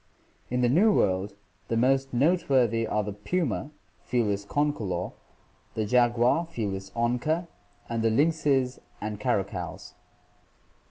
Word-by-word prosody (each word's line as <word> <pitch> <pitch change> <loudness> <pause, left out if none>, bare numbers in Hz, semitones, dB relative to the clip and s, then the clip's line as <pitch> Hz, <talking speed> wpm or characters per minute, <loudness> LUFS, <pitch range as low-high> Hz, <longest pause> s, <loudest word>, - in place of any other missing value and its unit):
In 125 0 0
the 125 - +4
New 185 - +5
World 100 - +1 0.3
the 115 - 0
most 135 +3 +2
noteworthy 125 -6 +2
are 105 0 0
the 105 0 -4
puma 135 - -2 0.3
(F. - - -28 0.4
concolor), 105 -12 -1 0.6
the 110 - 0
jaguar 120 +7 +3
(F. - - -22 0.4
onca), 125 +9 0 0.4
and 115 -1 -2
the 115 - +3
lynxes 140 -1 +2 0.2
and 105 -1 -5
caracals. 95 -3 -2
120 Hz, 115 wpm, -27 LUFS, 105-145 Hz, 0.6 s, New